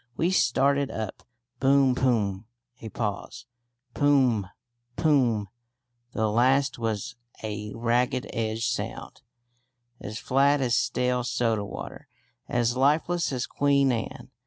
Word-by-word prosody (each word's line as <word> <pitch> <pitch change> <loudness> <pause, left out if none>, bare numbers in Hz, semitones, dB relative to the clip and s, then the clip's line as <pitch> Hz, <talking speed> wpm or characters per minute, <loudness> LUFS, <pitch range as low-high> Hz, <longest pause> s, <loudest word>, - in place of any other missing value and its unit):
We 170 +3 +1
started 140 -3 +2
up. 110 -3 -5 0.4
Boom 135 -1 +4
poom 110 -6 0 0.3
(a 110 - -6
pause). 105 -2 -4 0.5
Pom 130 -8 +3
m - - -17 0.5
poom 135 -8 +3
m. 100 - -9 0.7
The 110 -1 0
last 130 +5 +2
was 110 -3 -3 0.3
a 105 -1 -5
ragged 120 +2 0
edged 110 0 -2
sound, 120 +1 -4 0.8
as 105 +1 -6
flat 140 +4 +2
as 125 -3 0
stale 125 0 +1
soda 115 -3 0
water, 100 - -8 0.4
as 120 0 +1
lifeless 155 +6 +1
as 130 -2 -2
Queen 140 -1 +2
Anne. 125 +2 -5
125 Hz, 120 wpm, -26 LUFS, 110-135 Hz, 0.8 s, Boom